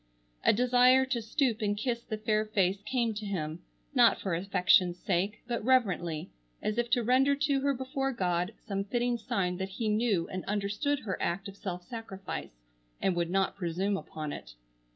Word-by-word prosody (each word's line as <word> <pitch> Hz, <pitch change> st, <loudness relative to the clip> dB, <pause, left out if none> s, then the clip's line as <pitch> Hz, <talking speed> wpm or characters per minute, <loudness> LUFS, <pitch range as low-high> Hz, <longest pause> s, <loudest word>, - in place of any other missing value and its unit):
A -, -, +6 dB
desire 250 Hz, +3 st, +5 dB
to 255 Hz, -3 st, -1 dB
stoop 230 Hz, 0 st, 0 dB
and 205 Hz, -1 st, 0 dB
kiss 235 Hz, +1 st, -1 dB
the 215 Hz, -, -5 dB
fair 215 Hz, 0 st, +1 dB
face 195 Hz, -2 st, +1 dB
came 230 Hz, +1 st, 0 dB
to 210 Hz, +1 st, -6 dB
him, 160 Hz, -4 st, -3 dB, 0.3 s
not -, -, +5 dB
for 190 Hz, -, -2 dB
affection's 180 Hz, 0 st, +3 dB
sake, 195 Hz, +4 st, -1 dB
but 235 Hz, -2 st, -2 dB
reverently, 185 Hz, -10 st, +1 dB, 0.3 s
as 215 Hz, +2 st, -1 dB
if 240 Hz, 0 st, 0 dB
to 245 Hz, -1 st, +2 dB
render 265 Hz, +4 st, +4 dB
to 285 Hz, -1 st, +1 dB
her 280 Hz, +1 st, +2 dB
before 265 Hz, +1 st, -2 dB
God 180 Hz, -2 st, -1 dB
some 195 Hz, -3 st, -3 dB
fitting 240 Hz, +3 st, 0 dB
sign 180 Hz, -4 st, -1 dB
that 190 Hz, +1 st, -3 dB
he 215 Hz, +3 st, -2 dB
knew 210 Hz, -5 st, +1 dB
and 185 Hz, 0 st, -4 dB
understood 210 Hz, +8 st, -1 dB
her 190 Hz, -4 st, -4 dB
act 175 Hz, +4 st, -1 dB
of 195 Hz, -, -9 dB
self 180 Hz, -3 st, -5 dB
sacrifice, 190 Hz, -, -7 dB, 0.4 s
and 190 Hz, -, +1 dB
would 170 Hz, -1 st, 0 dB
not 195 Hz, +1 st, +1 dB
presume 190 Hz, +2 st, -1 dB
upon 155 Hz, -5 st, -5 dB
it. -, -, -9 dB
205 Hz, 180 wpm, -30 LUFS, 180-240 Hz, 0.4 s, A